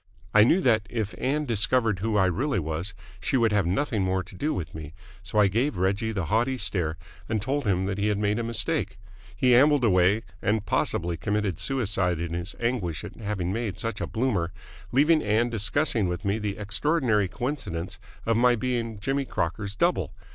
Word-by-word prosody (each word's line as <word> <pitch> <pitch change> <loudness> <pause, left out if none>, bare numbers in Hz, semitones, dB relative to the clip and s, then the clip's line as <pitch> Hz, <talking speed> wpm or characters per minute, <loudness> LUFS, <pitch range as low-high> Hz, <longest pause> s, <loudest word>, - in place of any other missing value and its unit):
I 105 - +8
knew 165 - +4
that, 110 - +2
if 110 -4 -3
Ann 150 +3 0
discovered 115 -3 +1
who 110 +2 0
I 95 - +4
really 130 - 0
was, 80 +4 -3 0.2
she 130 - 0
would 115 -3 +3
have 105 -4 +2
nothing 105 +3 0
more 95 0 0
to - - -15
do 150 +11 -1
with 85 - -4
me, 80 0 -8 0.3
so 100 +2 -5
I 105 - +6
gave 115 +4 0
Reggie 100 +5 0
the 95 -6 -2
haughty 120 - +1
stare 85 -8 0 0.3
and 110 -1 0
told 135 +5 -2
him 95 -1 +1
that 100 0 -2
he 100 - +1
had 105 -1 +1
made 105 +2 0
a - - -1
mistake. 115 -3 0 0.4
He 125 -1 +3
ambled 140 +2 +5
away 95 0 +3 0.2
and 105 0 0
possibly 85 -2 0
committed 100 -1 -1
suicide 100 -9 0
in 85 0 -3
his 85 +2 -3
anguish 115 -10 -1
at - - -8
having 100 -4 -2
made 110 -4 -3
such 115 +4 -3
a - - -2
bloomer 110 -8 0 0.4
leaving 150 +4 +4
Ann 110 +3 +1
discussing 110 0 +1
with 90 +2 -4
me 100 +3 +1
the 105 -2 -3
extraordinary 110 - +1
coincidence 100 - -4 0.3
of 115 -1 +2
my 120 +1 +5
being 115 -2 -2
Jimmy 135 +6 -1
Crocker's 100 +1 -3
double. - - +1
105 Hz, 190 wpm, -26 LUFS, 95-120 Hz, 0.4 s, I